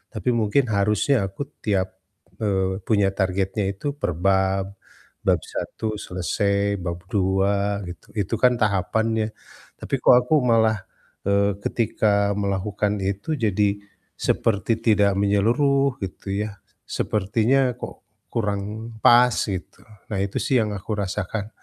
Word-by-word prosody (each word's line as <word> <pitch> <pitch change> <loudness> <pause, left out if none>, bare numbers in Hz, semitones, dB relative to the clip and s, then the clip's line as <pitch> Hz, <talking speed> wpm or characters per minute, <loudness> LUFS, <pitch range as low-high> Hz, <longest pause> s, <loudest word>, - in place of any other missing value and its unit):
tapi 110 +3 -1
mungkin 110 +6 +2
harusnya 105 +7 +2
aku 95 +8 -9 0.2
tiap, 95 -3 +1 0.5
eee, 95 -3 0
punya 100 -3 +3
targetnya 95 +2 0
itu 100 - -13
per - - 0
bab, 95 0 +2 0.6
bab - - +4
1 110 -1 -4
selesai, 100 +3 0
bab 85 0 -3
2 100 +1 +1
gitu. 90 - -9 0.2
Itu 95 - -4
kan 125 -1 +6
tahapannya, 110 +1 +1 0.5
tapi - - -9
kok - - +8
aku 125 - -1
malah, 115 -3 +3 0.5
eee, 100 0 +3
ketika 100 -3 +1
melakukan 100 +1 -1
itu 100 +11 -2
jadi 105 -5 +1 0.5
seperti 110 0 0 0.2
tidak 105 -2 +5
menyeluruh 125 +7 +2
gitu 95 - -7 0.2
ya. - - -6 0.4
Sepertinya 115 +5 +1
kok 125 - -9 0.2
kurang 105 +1 -3
pas 120 +1 +6 0.2
gitu. 95 -3 -6 0.3
Nah 100 -2 -1
itu 100 0 -2
sih 130 -4 +3
yang 110 - -1
aku 110 +3 -5
rasakan 100 +1 -3
100 Hz, 125 wpm, -23 LUFS, 95-110 Hz, 0.6 s, kok